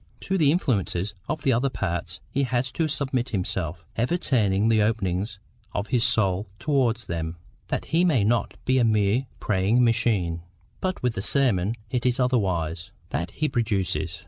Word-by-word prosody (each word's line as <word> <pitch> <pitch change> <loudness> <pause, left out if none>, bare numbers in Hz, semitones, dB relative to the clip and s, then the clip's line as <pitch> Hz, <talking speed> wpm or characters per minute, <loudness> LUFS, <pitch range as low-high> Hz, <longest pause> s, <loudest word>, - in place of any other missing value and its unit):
To 190 - -1
the 155 -6 +4
influences 105 - 0 0.2
of 155 - -2
the 135 - +3
other 125 +4 +2
parts 85 -7 -3
he 140 - 0
has 125 -1 0
to 165 +3 0
submit 135 -4 -1
himself, 90 -4 -3
ever 125 +10 +1
turning 105 - +2
the 110 -1 +4
openings 100 -2 0 0.4
of 100 +1 -2
his 120 -3 +2
soul 105 -5 +2
towards 125 -5 +1
them, 85 0 -4 0.3
that - - -2
he 165 +2 +2
may 150 - +3
not 115 +3 +1
be 130 0 +3
a - - +4
mere 110 +3 +2
praying 105 +5 +2
machine; 105 -8 +1 0.4
but 185 -6 -2
with 125 -2 +1
the 105 - -3
sermon 110 -5 +2 0.2
it 125 -2 0
is 125 +1 +1
otherwise. 90 -10 0 0.2
That 85 +5 -2
he 155 - -1
produces. 95 - -1
115 Hz, 170 wpm, -25 LUFS, 95-130 Hz, 0.4 s, the